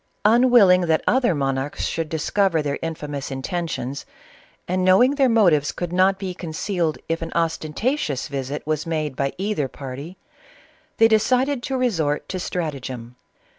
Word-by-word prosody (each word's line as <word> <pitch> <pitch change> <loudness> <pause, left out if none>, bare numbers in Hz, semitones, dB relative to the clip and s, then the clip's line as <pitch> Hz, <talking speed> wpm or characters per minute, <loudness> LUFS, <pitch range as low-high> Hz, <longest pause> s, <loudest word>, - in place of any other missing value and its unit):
Unwil 240 0 +6
ling 180 0 +5
that 160 -1 +2
other 250 -8 +2
monarchs 135 0 -2
should 165 -1 -2
discover 165 +1 +1
their 145 -1 -2
infamous 150 -4 -5
intentions, 140 -1 -4 0.6
and 185 +1 0
JKio'MJjg 245 +9 +5
their 270 -3 +3
motives 175 -11 +3
could 175 -1 -5
not 190 +1 +3
be 190 -2 -4
concealed 170 0 -2
if 165 0 -2
an 165 - -5
ostentatious 165 - -1
visit 140 +1 -4
was 155 0 -2
made 155 -4 -2
by 140 0 -1
either 195 -7 -1
party, 140 +7 -8 0.8
they 225 - +6
decided 250 +5 +2
to 265 +1 -2
resort 165 - 0
to 185 - -3
stratagem. 130 -9 -5
165 Hz, 145 wpm, -22 LUFS, 145-200 Hz, 0.8 s, Unwil